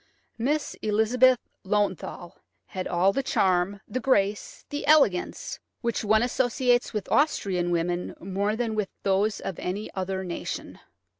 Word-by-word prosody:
Miss 290 Hz, +5 st, 0 dB
Elizabeth 235 Hz, +4 st, +4 dB, 0.3 s
Löwenthal 190 Hz, -3 st, -1 dB, 0.3 s
had 185 Hz, -1 st, -5 dB
all 185 Hz, +3 st, +2 dB
the 275 Hz, -, 0 dB
charm, 190 Hz, -4 st, +1 dB
the 255 Hz, -, -3 dB
grace, 205 Hz, -5 st, 0 dB
the 290 Hz, 0 st, -4 dB
elegance, 280 Hz, -13 st, +3 dB, 0.2 s
which 235 Hz, -3 st, -1 dB
one 215 Hz, +2 st, +4 dB
associates 245 Hz, 0 st, +1 dB
with 210 Hz, -4 st, -3 dB
Austrian 190 Hz, -, +2 dB
women 175 Hz, +1 st, -1 dB
more 200 Hz, +3 st, -1 dB
than 230 Hz, -1 st, -1 dB
with 210 Hz, -3 st, -1 dB
those 200 Hz, +2 st, +1 dB
of 190 Hz, -, -5 dB
any 200 Hz, +4 st, -4 dB
other 190 Hz, 0 st, -3 dB
nation. 175 Hz, -2 st, -5 dB
205 Hz, 135 wpm, -26 LUFS, 190-245 Hz, 0.3 s, Elizabeth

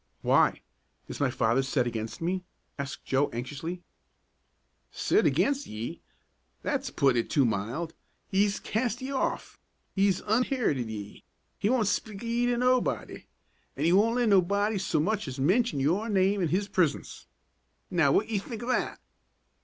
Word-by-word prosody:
"Why? -, -, +3 dB, 0.4 s
Is -, -, -7 dB
my 140 Hz, -, +2 dB
father 120 Hz, +1 st, +2 dB
set 135 Hz, -1 st, 0 dB
against 115 Hz, +6 st, -4 dB
me?" 185 Hz, +2 st, -1 dB, 0.4 s
asked 140 Hz, -1 st, -5 dB
Joe, 135 Hz, +2 st, +1 dB
anxiously. 145 Hz, +9 st, -5 dB, 1.1 s
"Set -, -, +1 dB
aginst 280 Hz, 0 st, +1 dB
ye? 115 Hz, +10 st, -6 dB, 0.6 s
That's 275 Hz, -2 st, -1 dB
puttin' 135 Hz, -, +2 dB
it -, -, -21 dB
too 140 Hz, -3 st, +3 dB
mild. 120 Hz, +10 st, -2 dB, 0.3 s
He's 200 Hz, +1 st, +1 dB
cast 240 Hz, +2 st, -2 dB
ye 265 Hz, -, -4 dB
off. 270 Hz, -, -2 dB, 0.3 s
He's 195 Hz, -2 st, +2 dB
unherited 220 Hz, -, 0 dB
ye. 105 Hz, -2 st, -8 dB, 0.4 s
He 205 Hz, -, +1 dB
won't 245 Hz, -3 st, +2 dB
speak 205 Hz, +1 st, -2 dB
of -, -, -4 dB
ye 240 Hz, +1 st, +1 dB
to 245 Hz, -1 st, +1 dB
nobody, 250 Hz, +1 st, 0 dB, 0.5 s
an' -, -, 0 dB
he 170 Hz, -, +4 dB
won't 220 Hz, +5 st, +4 dB
let 245 Hz, -2 st, +2 dB
nobody 200 Hz, +2 st, +3 dB
so 175 Hz, -4 st, 0 dB
much 205 Hz, +3 st, 0 dB
as 130 Hz, 0 st, -5 dB
mention 185 Hz, -, +2 dB
yer 175 Hz, +11 st, +1 dB
name 195 Hz, 0 st, +2 dB
in 175 Hz, -, +2 dB
his 190 Hz, +6 st, 0 dB
presience. 180 Hz, -7 st, -1 dB, 0.6 s
Now 160 Hz, -6 st, +3 dB
what 210 Hz, +9 st, +2 dB
ye 220 Hz, -3 st, 0 dB
think 225 Hz, +3 st, -7 dB
o' -, -, -6 dB
that?" 255 Hz, -, 0 dB
190 Hz, 160 wpm, -28 LUFS, 140-220 Hz, 1.1 s, he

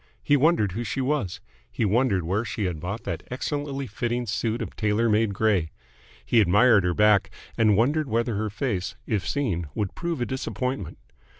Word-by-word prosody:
He 145 Hz, -, +4 dB
wondered 145 Hz, -, +3 dB
who 115 Hz, +6 st, -3 dB
she 120 Hz, -, -3 dB
was. 135 Hz, -8 st, -1 dB, 0.3 s
He 115 Hz, -, -1 dB
wondered 105 Hz, -3 st, +2 dB
where 95 Hz, +7 st, 0 dB
she 110 Hz, -2 st, -4 dB
had 90 Hz, -5 st, -2 dB
bought 95 Hz, +7 st, -5 dB
that -, -, -4 dB
excellently 140 Hz, +1 st, -3 dB
fitting 120 Hz, +2 st, -2 dB
suit 115 Hz, +1 st, -1 dB
of 115 Hz, -, -5 dB
tailor 105 Hz, +2 st, +1 dB
made 105 Hz, 0 st, +2 dB
grey. 95 Hz, -7 st, +2 dB, 0.6 s
He 115 Hz, -, +4 dB
admired 105 Hz, +2 st, +5 dB
her 90 Hz, -1 st, 0 dB
back, 105 Hz, -2 st, +4 dB, 0.3 s
and 110 Hz, -3 st, +3 dB
wondered 145 Hz, +6 st, +2 dB
whether 115 Hz, +1 st, 0 dB
her 105 Hz, +1 st, -1 dB
face, 100 Hz, -4 st, -2 dB
if 100 Hz, -6 st, -1 dB
seen, 95 Hz, -, -1 dB
would 105 Hz, -3 st, -2 dB
prove 170 Hz, -4 st, -3 dB
a 120 Hz, -, 0 dB
disappointment. 125 Hz, -, -3 dB
110 Hz, 180 wpm, -25 LUFS, 100-125 Hz, 0.6 s, admired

